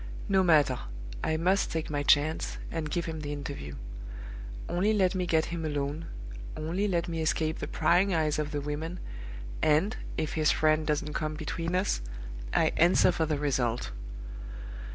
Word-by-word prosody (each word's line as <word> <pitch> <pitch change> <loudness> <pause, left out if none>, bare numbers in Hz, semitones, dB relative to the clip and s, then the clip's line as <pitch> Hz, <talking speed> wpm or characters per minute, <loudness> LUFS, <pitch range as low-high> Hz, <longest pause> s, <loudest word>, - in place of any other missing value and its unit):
No 190 -1 +4
matter! 150 -7 +5 0.4
I 160 - +1
must 185 +4 +2
take 160 -2 -2
my 145 -1 0
chance, 145 +2 +3
and 160 -2 -2
give 170 +2 -1
him 160 -1 -4
the 145 -1 -4
interview. 140 - -5 0.9
Only 195 +5 +2
let 190 -3 +3
me 180 -2 -1
get 160 -2 +3
him 165 -1 -2
alone, 145 +1 -2 0.5
only 170 +7 0
let 175 -2 +1
me 165 -1 -2
escape 160 0 +1
the - - -3
prying 185 +3 +3
eyes 155 -3 +2
of 150 -1 -1
the 145 -1 -2
women, 155 +5 -3 0.6
and 160 +10 +3 0.2
if 155 -1 -1
his 155 -1 +3
friend 155 0 +3
doesn't 150 0 0
come 155 0 -1
between 165 +2 -2
us 185 - +1 0.5
I - - +3
answer 175 +2 +6
for 160 -2 0
the 150 -1 +1
result! 125 - 0
155 Hz, 165 wpm, -30 LUFS, 150-175 Hz, 0.9 s, answer